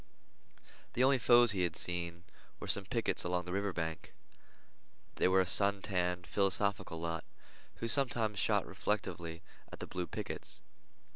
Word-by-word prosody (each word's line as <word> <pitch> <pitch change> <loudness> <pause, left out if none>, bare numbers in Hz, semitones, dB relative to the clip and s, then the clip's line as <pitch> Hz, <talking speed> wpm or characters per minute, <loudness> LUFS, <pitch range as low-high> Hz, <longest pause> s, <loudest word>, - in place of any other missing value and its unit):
The 125 - +2
only 135 0 +4
foes 120 -1 +6
he 95 -2 -1
had 85 -2 0
seen 85 -1 -2 0.4
were - - -6
some 100 - +1
pickets 115 +4 +1
along 90 0 -1
the 90 - -6
river 100 +1 -1
bank. 80 -3 -5 1.0
They - - +3
were 95 +1 +4
a - - 0
sun 100 +2 +5
tanned, 90 -2 -1
philosophical 100 -3 0
lot, 80 -1 -3 0.5
who 115 - -4
sometimes 115 -5 +1
shot - - +1
reflectively 85 -1 -3 0.3
at - - -9
the - - -5
blue 90 -1 -4
pickets. - - -6
95 Hz, 150 wpm, -34 LUFS, 85-105 Hz, 1.0 s, foes